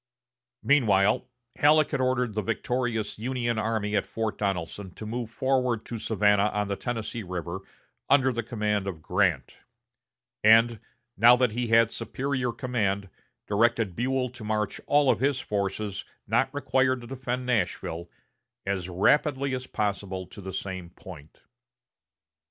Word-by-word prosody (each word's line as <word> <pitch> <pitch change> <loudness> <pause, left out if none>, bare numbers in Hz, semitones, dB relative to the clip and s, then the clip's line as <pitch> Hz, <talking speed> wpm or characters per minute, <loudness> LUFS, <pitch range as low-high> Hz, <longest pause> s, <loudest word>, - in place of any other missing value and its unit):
Meanwhile, 110 -4 +3 0.3
Halleck 155 +1 +4
had 140 -4 0
ordered 125 -3 +1
the 105 - -1
victorious 115 0 -2
Union 120 -1 -1
army 110 -1 -1
at 100 - 0
Fort 110 -1 -3
Donelson 95 -1 -3
to 110 - -8
move 115 +1 -4
forward 125 -2 0
to 115 - -5
Savannah 105 -2 +3
on 105 -1 -1
the 100 - 0
Tennessee 115 0 -4
River 90 -1 -5 0.5
under 135 -2 +5
the 120 - -1
command 105 -3 -1
of 80 -5 -5
Grant; - - 0 0.8
and, 115 +1 +6 0.4
now 120 +2 +7
that 125 -2 +2
he 120 +2 -2
had 115 0 +4
superior 125 +2 -2
command, 100 -5 -1 0.4
directed 110 -2 +1
Buell 130 +1 0
to 120 -3 -11
march 105 -1 -2
all 145 -2 +4
of - - -1
his 135 0 +1
forces 100 -2 -3 0.2
not - - +1
required 130 -2 +1
to - - -10
defend 125 0 -4
Nashville 90 -7 -1 0.6
"as 95 -2 -2
rapidly 140 - +2
as 130 0 -4
possible" 100 -3 -2
to 100 - -12
the 95 0 -6
same 95 -2 -5
point. 85 -4 -13
115 Hz, 140 wpm, -27 LUFS, 100-125 Hz, 0.8 s, now